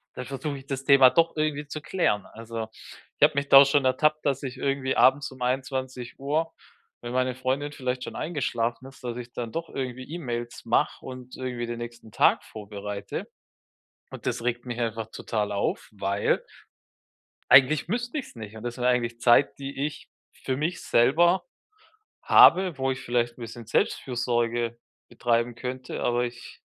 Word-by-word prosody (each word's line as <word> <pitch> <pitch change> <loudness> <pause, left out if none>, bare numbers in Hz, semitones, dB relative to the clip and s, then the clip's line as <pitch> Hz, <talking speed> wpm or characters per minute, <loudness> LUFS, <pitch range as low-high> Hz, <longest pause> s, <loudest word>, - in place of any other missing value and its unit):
dann 125 - -5
versuche 140 +1 -4
ich 135 - -14
das 135 -1 -4
Thema 135 -3 +7
doch 165 -1 +2
irgendwie 150 -1 -1
zu 155 +2 -6
klären. 145 - 0
Also, 115 0 -6 0.5
ich - - -22
habe 150 0 +6
mich 140 0 -1
da 135 +1 +10
schon 140 0 +2
ertappt, 150 +4 +2
dass 140 -1 +1
ich 130 -1 -5
irgendwie 135 0 -1
abends 135 +2 +4
um 130 -2 -11
21:00, 130 +4 -2 0.5
wenn 120 0 -6
meine 130 0 +1
Freundin 135 +3 -2
vielleicht 130 -2 -3
schon - - -7
eingeschlafen 125 -6 -2
ist, 135 - -16
dass 120 -1 -3
ich 120 -1 -8
dann 115 -2 -5
doch 165 0 -4
irgendwie 130 -1 -4
E-Mails 120 -8 -5
mache 115 - +1
und 130 -1 -9
irgendwie 125 -2 -4
den 120 0 -5
nächsten 120 -2 -9
Tag - - +4
vorbereite. 105 -1 -6 0.8
Und - - -9
das - - -1
regt 120 0 -1
mich 120 -1 -5
einfach 115 -1 -2
total 105 -2 -2
auf, 100 - -2
weil 100 0 0 1.1
eigentlich 140 +4 +6
müsste 245 +6 -2
ich 270 - -5
es - - -18
nicht. 110 -1 -9
Und 110 - -9
das 120 0 -4
wäre 125 - 0
eigentlich 120 -2 +1
Zeit, 120 +4 +4
die 140 0 -4
ich 150 - -5 0.2
für 130 -1 -4
mich 155 +5 -2
selber 170 +10 +4 0.8
habe, 180 -3 +6
wo 135 0 0
ich 130 - -4
vielleicht 120 0 -1
'n - - -12
bisschen 115 0 -8
Selbstfürsorge 120 -1 0 0.3
betreiben 120 0 0
könnte. 125 +1 -5
Aber 120 0 +1
ich 120 0 -9
130 Hz, 170 wpm, -26 LUFS, 120-140 Hz, 1.1 s, da